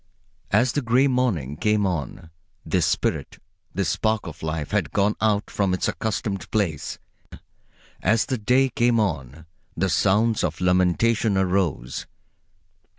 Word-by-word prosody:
As 115 Hz, +5 st, +3 dB
the 145 Hz, -, -1 dB
gray 125 Hz, +2 st, +3 dB
morning 110 Hz, -, 0 dB
came 105 Hz, +2 st, +1 dB
on, 85 Hz, -2 st, -4 dB, 0.3 s
this -, -, +1 dB
spirit, -, -, -1 dB, 0.3 s
this 100 Hz, -2 st, -1 dB
spark 110 Hz, -1 st, 0 dB
of 85 Hz, -, -9 dB
life, 80 Hz, -2 st, -3 dB
had -, -, 0 dB
gone 105 Hz, +1 st, +1 dB
out 105 Hz, -1 st, +1 dB
from 95 Hz, -2 st, +1 dB
its -, -, -1 dB
accustomed 100 Hz, -4 st, -3 dB
place. 95 Hz, -9 st, -1 dB, 1.0 s
As 110 Hz, +4 st, +2 dB
the 130 Hz, -, -2 dB
day 125 Hz, +5 st, +3 dB
came 120 Hz, -1 st, +2 dB
on, 80 Hz, -, -2 dB, 0.3 s
the 95 Hz, +3 st, +1 dB
sounds 105 Hz, +7 st, +2 dB
of -, -, -2 dB
lamentation 95 Hz, +4 st, +2 dB
arose. 90 Hz, -9 st, -1 dB
100 Hz, 135 wpm, -24 LUFS, 85-110 Hz, 1.0 s, As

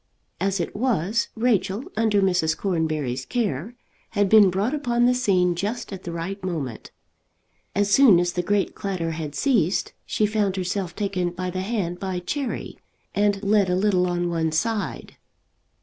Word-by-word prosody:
As 195 Hz, 0 st, 0 dB
it 170 Hz, -, -3 dB
was, 215 Hz, -2 st, 0 dB
Rachel, 225 Hz, -2 st, +1 dB
under 210 Hz, -2 st, +2 dB
Mrs. 175 Hz, -4 st, +2 dB
Cornbury's 155 Hz, -9 st, -1 dB
care, 215 Hz, -, -2 dB, 0.4 s
had 205 Hz, -1 st, +3 dB
been 210 Hz, -2 st, +7 dB
brought 200 Hz, +8 st, 0 dB
upon 240 Hz, -5 st, +1 dB
the 250 Hz, -, +4 dB
scene 185 Hz, -8 st, +2 dB
just 205 Hz, +5 st, -4 dB
at 190 Hz, -, -8 dB
the 170 Hz, -, -4 dB
right 175 Hz, +4 st, -5 dB
moment. 150 Hz, -11 st, -4 dB, 0.9 s
As 205 Hz, +1 st, +1 dB
soon 220 Hz, -6 st, +7 dB
as 175 Hz, 0 st, 0 dB
the 180 Hz, -, 0 dB
great 200 Hz, +2 st, 0 dB
clatter 180 Hz, -5 st, -3 dB
had 155 Hz, -2 st, -5 dB
ceased, 205 Hz, -, +1 dB
she 215 Hz, -, +1 dB
found 210 Hz, -2 st, 0 dB
herself 185 Hz, -1 st, -3 dB
taken 195 Hz, -4 st, -1 dB
by 180 Hz, +1 st, -4 dB
the 185 Hz, +1 st, -3 dB
hand 190 Hz, -4 st, -2 dB
by 190 Hz, -2 st, -3 dB
Cherry, 245 Hz, +9 st, -4 dB, 0.3 s
and 205 Hz, -1 st, +1 dB
led 200 Hz, -2 st, +3 dB
a 180 Hz, -, +2 dB
little 185 Hz, -2 st, +2 dB
on 175 Hz, 0 st, -1 dB
one 160 Hz, -1 st, 0 dB
side. 210 Hz, +7 st, -2 dB
195 Hz, 165 wpm, -24 LUFS, 175-210 Hz, 0.9 s, been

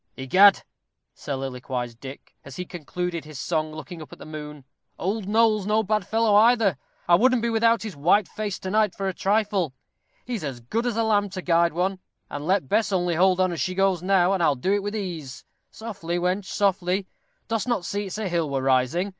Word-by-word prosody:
"Egad," 190 Hz, +10 st, +5 dB, 0.5 s
soliloquized 125 Hz, -3 st, -5 dB
Dick, 135 Hz, +1 st, -10 dB
as 140 Hz, -, -11 dB
he 180 Hz, -, -5 dB
concluded 175 Hz, +1 st, -4 dB
his 150 Hz, -1 st, -10 dB
song, 155 Hz, +2 st, -1 dB
looking 155 Hz, +2 st, -9 dB
up 155 Hz, -, -11 dB
at -, -, -11 dB
the -, -, -11 dB
moon. 150 Hz, -2 st, -8 dB, 0.3 s
"Old 200 Hz, +2 st, -2 dB
Noll's 215 Hz, -2 st, +2 dB
no 215 Hz, +1 st, +2 dB
bad 210 Hz, -2 st, -1 dB
fellow, 225 Hz, -1 st, +2 dB
either. 215 Hz, -, +4 dB, 0.3 s
I 175 Hz, -, +4 dB
wouldn't 245 Hz, +5 st, +4 dB
be 235 Hz, -, +1 dB
without 230 Hz, -1 st, +3 dB
his 215 Hz, -6 st, -6 dB
white 175 Hz, +8 st, +3 dB
face 210 Hz, -2 st, -4 dB
to 185 Hz, -, -4 dB
night 215 Hz, -2 st, +2 dB
for 195 Hz, -, -3 dB
a 190 Hz, -, -1 dB
trifle. 200 Hz, -8 st, 0 dB, 0.5 s
He's 230 Hz, -7 st, -4 dB
as 135 Hz, -4 st, -4 dB
good 225 Hz, -, -2 dB
as 230 Hz, -2 st, -2 dB
a 230 Hz, -, +2 dB
lamp 205 Hz, -3 st, +1 dB
to 185 Hz, -2 st, -5 dB
guide 170 Hz, -1 st, +3 dB
one, 185 Hz, +3 st, -1 dB, 0.3 s
and 145 Hz, +2 st, -5 dB
let 190 Hz, -6 st, +1 dB
Bess 210 Hz, -, +1 dB
only 175 Hz, -2 st, +1 dB
hold 185 Hz, +2 st, +3 dB
on 185 Hz, -1 st, +2 dB
as 165 Hz, -5 st, -3 dB
she 185 Hz, +6 st, -2 dB
goes 195 Hz, -2 st, +2 dB
now, 185 Hz, 0 st, +3 dB
and 190 Hz, -, 0 dB
I'll 150 Hz, -4 st, +3 dB
do 185 Hz, +10 st, 0 dB
it 205 Hz, -, +1 dB
with 205 Hz, +2 st, -4 dB
ease. 165 Hz, -10 st, -6 dB, 0.2 s
Softly, 195 Hz, -7 st, -5 dB
wench, 180 Hz, +3 st, -1 dB
softly 190 Hz, -1 st, 0 dB, 0.4 s
dost 225 Hz, +1 st, -2 dB
not 235 Hz, -8 st, -1 dB
see 205 Hz, 0 st, -3 dB
it's 190 Hz, -, -6 dB
a 215 Hz, -2 st, -2 dB
hill 170 Hz, -4 st, -1 dB
we're 135 Hz, -1 st, -1 dB
rising. 135 Hz, +8 st, +1 dB
185 Hz, 210 wpm, -24 LUFS, 155-210 Hz, 0.5 s, Egad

